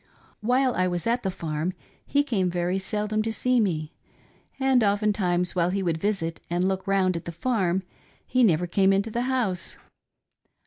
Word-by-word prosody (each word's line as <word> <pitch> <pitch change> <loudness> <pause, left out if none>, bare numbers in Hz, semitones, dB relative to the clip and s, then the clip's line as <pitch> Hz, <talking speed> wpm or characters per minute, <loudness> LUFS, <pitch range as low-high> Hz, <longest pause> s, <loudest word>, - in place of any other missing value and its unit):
While 255 +3 +2
I 185 0 +1
was 175 -2 -2
at 235 +2 +1
the 190 - -1
farm 165 0 -3 0.3
he 285 0 +2
came 195 -10 0
very 175 +2 -1
seldom 210 +2 -1
to 225 +1 -1
see 250 +2 +2
me, 160 -7 -1 0.7
and 265 -3 +3
oftentimes 200 -4 +1
while 175 -1 +2
he 195 +1 -1
would 165 -3 0
visit 170 -4 -1
and 175 +2 +1
look 190 0 -2
round 190 -2 +2
at 170 - -5
the 170 - -4
farm 190 -2 0 0.4
he 255 0 +2
never 175 -5 +3
came 190 +2 +3
into 200 +3 0
the 235 - -1
house. 205 -10 -1
190 Hz, 175 wpm, -26 LUFS, 175-220 Hz, 0.7 s, and